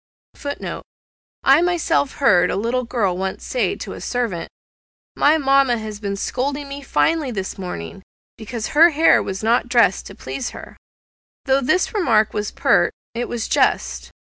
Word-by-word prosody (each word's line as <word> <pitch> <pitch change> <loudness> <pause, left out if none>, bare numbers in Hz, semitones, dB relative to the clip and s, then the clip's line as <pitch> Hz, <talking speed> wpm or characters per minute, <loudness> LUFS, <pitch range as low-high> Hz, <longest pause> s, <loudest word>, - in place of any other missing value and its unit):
(*Footnote. 285 0 -6 0.6
I 275 +4 +6
myself 345 -5 +1
heard 180 -10 +3
a - - -1
little 235 +5 -1
girl 210 -7 0
once 190 +1 -4
say - - -1
to - - -7
a - - -9
servant, 235 -9 -3 0.7
"My 305 +2 +4
mamma 275 -4 +3
has 215 -2 -7
been 200 -2 -3
scolding 280 +7 -3
me 280 +1 -7
finely 310 +1 +1
this 195 -4 -5
morning, 180 - -6 0.3
because 220 0 -5
her 325 +3 +6
hair 320 +1 +4
was 195 +2 -5
not 235 +2 +2
dressed 230 -7 +3
to - - -11
please 135 - -5
her." - - -11 0.7
Though 270 0 +2
this 365 - +1
remark 225 - +2
was 210 0 -2
pert, - - +2 0.2
it 240 +1 -3
was 235 -2 -3
just. - - 0
245 Hz, 160 wpm, -20 LUFS, 205-280 Hz, 0.7 s, I